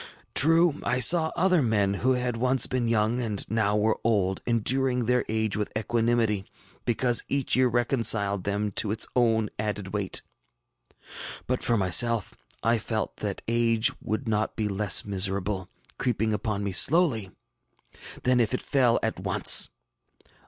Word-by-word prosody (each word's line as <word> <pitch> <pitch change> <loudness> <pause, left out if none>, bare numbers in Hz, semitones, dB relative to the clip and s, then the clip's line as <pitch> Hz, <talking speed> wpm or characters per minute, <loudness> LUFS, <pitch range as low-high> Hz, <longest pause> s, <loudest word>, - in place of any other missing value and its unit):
True, 165 +1 +3
I 125 +1 -1
saw 160 +4 +6
other 180 -2 +2
men, 105 -5 0
who 130 +6 0
had 125 -1 -2
once 130 +2 +1
been 125 -2 -2
young 115 +2 0
and 105 -4 -4
now 105 -2 0
were 110 +1 0
old, 100 -4 0
enduring 125 +2 +1
their 125 +2 +1
age 110 -2 -1
with 105 -1 -3
equanimity, 115 -3 -1 0.4
because 120 0 +1
each 140 -2 0
year 130 0 +3
reconciled 115 -5 +1
them 100 +1 -2
to 105 - +3
its 110 +2 0
own 115 -3 +1
added 105 -2 -4
weight. 100 -2 -1 1.2
But 125 0 -2
for 120 - 0
myself, 105 +4 +2 0.3
I 115 +1 +1
felt 110 0 -4
that 100 -2 -5
age 115 -1 +1
would 110 +5 -4
be 110 - -3
not 110 +1 -2
less 105 -1 +1
miserable, 95 -1 -1 0.3
creeping 110 -3 -1
upon 105 0 -3
me 100 - -3
slowly, 130 - +3 0.9
than 125 0 +2
if 120 +1 0
it - - -5
fell 125 -4 +1
at - - -3
once. - - +4
115 Hz, 150 wpm, -25 LUFS, 105-125 Hz, 1.2 s, saw